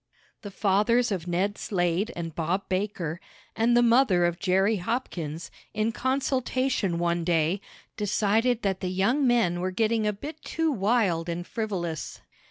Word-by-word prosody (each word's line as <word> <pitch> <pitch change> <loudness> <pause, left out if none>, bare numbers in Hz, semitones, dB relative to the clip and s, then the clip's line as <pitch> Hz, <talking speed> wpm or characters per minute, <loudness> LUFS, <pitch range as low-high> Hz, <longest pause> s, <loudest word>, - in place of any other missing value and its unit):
The 205 - -7
fathers 210 +5 +2
of 180 -3 -3
Ned 190 +4 -1
Slade 180 +3 0
and 165 -2 -5
Bob 175 +5 -2
Baker, 185 -4 -2 0.3
and 235 +2 +3
the 240 - +5
mother 230 -7 +4
of 175 0 -1
Jerry 195 +2 +2
Hopkins, 175 - -4 0.2
in 215 +1 +1
consultation 255 -6 0
one 170 0 0
day, 165 +2 +1 0.4
decided 220 +3 +1
that 190 -2 0
the 185 - -2
young 230 +10 +2
men 225 -8 +2
were 185 +1 -1
getting 220 +3 +1
a - - +2
bit 295 +9 -8
too 325 -1 -1
wild 195 - +1
and 170 +1 -3
frivolous. 180 -9 -4
200 Hz, 150 wpm, -27 LUFS, 175-230 Hz, 0.4 s, the